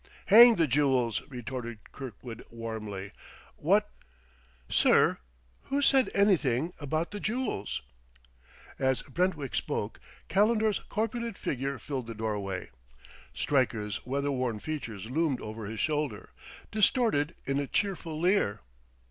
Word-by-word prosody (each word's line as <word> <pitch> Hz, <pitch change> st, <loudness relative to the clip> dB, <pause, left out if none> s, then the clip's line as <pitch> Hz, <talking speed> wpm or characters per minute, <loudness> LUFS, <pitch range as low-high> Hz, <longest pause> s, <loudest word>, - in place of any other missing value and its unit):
"Hang 230 Hz, +3 st, +9 dB
the 165 Hz, -, +3 dB
jewels!" 130 Hz, -4 st, +2 dB
retorted 120 Hz, -3 st, -6 dB
Kirkwood 120 Hz, -2 st, -8 dB
warmly. 110 Hz, -4 st, -6 dB, 0.4 s
"What -, -, +2 dB, 0.4 s
" 65 Hz, 0 st, -31 dB, 0.2 s
"Sir, -, -, +4 dB, 0.5 s
who 280 Hz, -, 0 dB
said 270 Hz, -2 st, +4 dB
anything 170 Hz, -, +3 dB
about 155 Hz, +3 st, -2 dB
the 205 Hz, -, -5 dB
jewels?" 215 Hz, -, -2 dB, 1.0 s
As 130 Hz, -1 st, +1 dB
Brentwick 150 Hz, -, -1 dB
spoke, -, -, -2 dB, 0.3 s
Calendar's 215 Hz, +1 st, +3 dB
corpulent 230 Hz, 0 st, -2 dB
figure 135 Hz, +1 st, -2 dB
filled 130 Hz, -2 st, -5 dB
the 115 Hz, -, -6 dB
doorway; 105 Hz, -, -3 dB, 0.6 s
Stryker's 115 Hz, -7 st, 0 dB
weather 140 Hz, +3 st, -1 dB
worn 125 Hz, -5 st, -1 dB
features 115 Hz, -8 st, -5 dB
loomed 140 Hz, +1 st, 0 dB
over 110 Hz, -1 st, -6 dB
his 110 Hz, +1 st, -5 dB
shoulder, 150 Hz, -7 st, -1 dB, 0.4 s
distorted 210 Hz, -, +2 dB
in 135 Hz, +1 st, 0 dB
a 140 Hz, -, -2 dB
cheerful 175 Hz, -5 st, -1 dB
leer. 175 Hz, -, +2 dB
140 Hz, 115 wpm, -29 LUFS, 115-185 Hz, 1.0 s, Hang